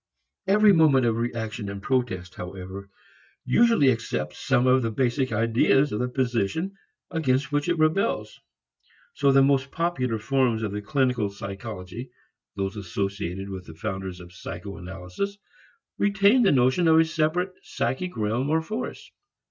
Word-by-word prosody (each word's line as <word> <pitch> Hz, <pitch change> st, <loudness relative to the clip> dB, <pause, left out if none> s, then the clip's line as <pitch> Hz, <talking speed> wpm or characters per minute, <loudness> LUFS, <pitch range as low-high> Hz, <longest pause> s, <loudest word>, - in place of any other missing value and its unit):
Every 210 Hz, +1 st, +6 dB
moment 150 Hz, -7 st, +5 dB
of 115 Hz, -1 st, +1 dB
reaction 115 Hz, -2 st, -3 dB
and 100 Hz, 0 st, -5 dB
protest, 105 Hz, -6 st, -1 dB
however, 95 Hz, +2 st, -8 dB, 0.6 s
usually 230 Hz, -, +4 dB
accepts 115 Hz, -1 st, -3 dB
some 130 Hz, -2 st, +2 dB
of 130 Hz, 0 st, +4 dB
the 115 Hz, -, -1 dB
basic 130 Hz, +3 st, 0 dB
ideas 115 Hz, +5 st, +3 dB
of 105 Hz, -, -2 dB
the 125 Hz, -, 0 dB
position 130 Hz, -, -1 dB, 0.4 s
against 145 Hz, -4 st, 0 dB
which 145 Hz, +3 st, 0 dB
it 175 Hz, -, +1 dB
rebels. 155 Hz, -, 0 dB, 0.7 s
So 140 Hz, 0 st, +3 dB
the 135 Hz, 0 st, +6 dB
most 135 Hz, 0 st, +2 dB
popular 135 Hz, -10 st, -1 dB
forms 120 Hz, -1 st, +1 dB
of 105 Hz, -, -2 dB
the 105 Hz, +1 st, -4 dB
clinical 125 Hz, -2 st, 0 dB
psychology, 100 Hz, +2 st, -7 dB, 0.5 s
those 95 Hz, 0 st, -3 dB
associated 100 Hz, 0 st, -4 dB
with 95 Hz, -1 st, -7 dB
the 80 Hz, -, -10 dB
founders 95 Hz, -1 st, -5 dB
of 90 Hz, 0 st, -12 dB
psycho 90 Hz, +2 st, -7 dB
analysis, 95 Hz, -, -5 dB, 0.6 s
retain 205 Hz, +4 st, +4 dB
the 205 Hz, -, +5 dB
notion 130 Hz, +6 st, +3 dB
of 160 Hz, 0 st, +6 dB
a 165 Hz, -, +5 dB
separate 160 Hz, +4 st, 0 dB
psychic 160 Hz, +6 st, -3 dB
realm 110 Hz, +6 st, 0 dB
or 160 Hz, +1 st, +2 dB
force. 215 Hz, +8 st, -6 dB
125 Hz, 150 wpm, -25 LUFS, 100-155 Hz, 0.7 s, Every